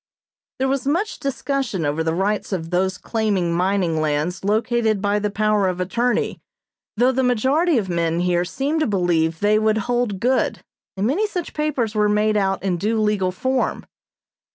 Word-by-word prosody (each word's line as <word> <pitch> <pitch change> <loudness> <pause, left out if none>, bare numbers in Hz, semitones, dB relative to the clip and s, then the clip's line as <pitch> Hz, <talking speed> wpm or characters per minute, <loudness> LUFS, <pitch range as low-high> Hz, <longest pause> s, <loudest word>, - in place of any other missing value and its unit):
There 265 - 0
was 270 0 -1
much 350 +9 -1
discussion 270 - -2
over 150 +3 0
the 160 0 -1
rights 205 +4 -1
of 165 -3 -3
those 185 +1 0
claiming 205 -7 -1
mining 180 -2 +1
lands 155 +5 -1
located 220 +1 +1
by 205 +1 +1
the 210 0 -1
power 210 -1 +1
of 180 -1 -2
attorney; 235 +7 -1 0.6
though 250 +3 +4
the 260 +1 0
majority 265 +7 +2
of 205 -4 -1
men 170 -1 0
here 175 -1 +1
seemed 275 - -2
to 310 - +1
believe 170 -5 +1
they 210 +1 +3
would 215 0 +2
hold 240 -2 -1
good, 255 +5 0 0.3
and 195 - 0
many 350 - +1
such 360 -5 -5
papers 285 -8 -1
were 210 -1 +2
made 210 +1 +2
out 195 -2 0
in 185 -3 0
due 220 +5 0
legal 210 -4 +1
form. 260 +7 -1
210 Hz, 175 wpm, -21 LUFS, 180-245 Hz, 0.6 s, though